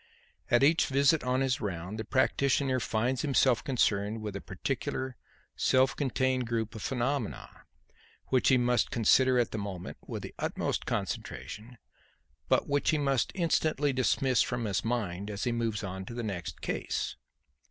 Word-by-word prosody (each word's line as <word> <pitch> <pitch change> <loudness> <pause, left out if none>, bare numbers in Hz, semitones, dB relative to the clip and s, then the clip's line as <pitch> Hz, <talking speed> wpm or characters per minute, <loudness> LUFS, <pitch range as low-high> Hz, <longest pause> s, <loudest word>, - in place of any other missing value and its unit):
At 120 +2 +4
each 160 +4 +4
visit 140 +4 +3
on 125 +1 +1
his 135 +1 0
round, 95 +1 -4
the - - -2
practitioner 130 +1 +2
finds 120 +2 0
himself 135 -4 +3
concerned 110 -4 +1
with 105 -2 -4
a 100 - -4
particular, 130 +5 -3 0.4
self 130 +1 +3
contained 130 -2 0
group 115 -2 -2
of 110 - -7
phenomena 130 0 -2 0.8
which 130 -1 +3
he 130 - +6
must 125 0 +2
consider 130 +3 +4
at 120 -2 +1
the 110 - -3
moment 95 -3 -6
with - - -5
the - - -7
utmost - - -2
concentration, 105 - -4 0.7
but - - +3
which 145 0 +1
he 155 - +3
must 140 -5 +1
instantly 155 -5 +1
dismiss 130 0 +2
from 120 -1 -1
his 100 -3 -1
mind 105 -5 -2
as 100 -1 -4
he 120 - +1
moves 115 -3 -1
on 95 -1 -5
to 115 - -8
the 120 - -3
next 95 -6 -5
case. - - -2
125 Hz, 160 wpm, -30 LUFS, 105-135 Hz, 0.8 s, he